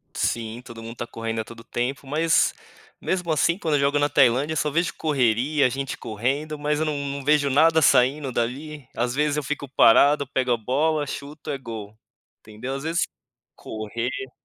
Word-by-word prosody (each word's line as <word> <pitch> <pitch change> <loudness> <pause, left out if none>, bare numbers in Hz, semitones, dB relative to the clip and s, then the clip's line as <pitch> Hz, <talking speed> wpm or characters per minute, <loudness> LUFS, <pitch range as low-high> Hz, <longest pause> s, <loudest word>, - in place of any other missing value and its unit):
Sim, 115 +1 -2
todo 115 -2 -10
mundo 115 +1 -8
tá 120 - -5
correndo 115 -1 -3
a - - -5
todo 115 0 -12
tempo, 125 +4 -3
mas 165 +5 +2 0.5
mesmo 180 -3 -1
assim 170 +3 +2
quando 160 -6 0
eu 145 - +2
jogo 140 +1 +2
na 145 0 +2
Tailândia, 140 +3 +3
eu - - -2
só 150 - +1
vejo 170 +3 0
correria, 135 0 +2
gente 135 +1 -4
correndo, 135 +8 -2
mas 150 +1 -1
eu 160 - +1
não 150 -1 -1
não 140 -1 -4
vejo 145 -1 +3
nada 160 +3 +4
saindo 135 +1 +3
dali, 135 +4 -3
às 120 +1 -1
vezes, 150 +1 +1
eu 150 - -1
fico 145 0 -4
parado, 140 +3 +5
pego 130 -2 0
a 120 - +3
bola, 145 +6 0
chuto, 145 +2 -8
é 140 - -2
gol, 110 -5 -8 0.5
entendeu? 110 +5 -6
Às 135 - -5
vezes 165 +3 0 0.5
correr 115 +4 -5
140 Hz, 185 wpm, -24 LUFS, 120-150 Hz, 0.5 s, parado